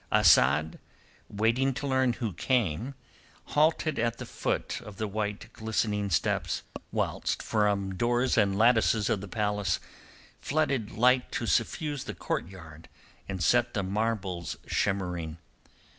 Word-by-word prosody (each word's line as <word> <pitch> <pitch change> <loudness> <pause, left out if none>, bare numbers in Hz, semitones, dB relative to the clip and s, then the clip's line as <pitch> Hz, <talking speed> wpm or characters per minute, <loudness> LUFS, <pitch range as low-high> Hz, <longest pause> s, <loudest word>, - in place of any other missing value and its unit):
Asad, 80 +2 +4 0.5
waiting 115 +6 +1
to 145 - -4
learn 130 -2 +2
who 115 -5 -3
came, 120 - 0 0.6
halted 155 -1 +2
at 115 0 0
the - - -6
foot - - -2
of 105 -2 -11
the 110 - -2
white 105 0 -4
glistening 105 -2 -1
steps, 85 - 0 0.3
whilst - - -1
from 100 -3 +1
doors 120 +5 +1
and 100 -3 +2
lattices 115 -1 +3
of 105 -4 0
the 100 - -7
palace 105 -2 0 0.6
flooded 140 -7 0
light 125 +2 +3
to 120 - -1
suffuse 145 +3 0
the - - -6
courtyard 80 -3 -6 0.4
and 95 -3 -2
set 120 +8 +3
the 100 - 0
marbles 100 -3 -2
shimmering. 90 -5 -1
110 Hz, 130 wpm, -28 LUFS, 95-120 Hz, 0.6 s, Asad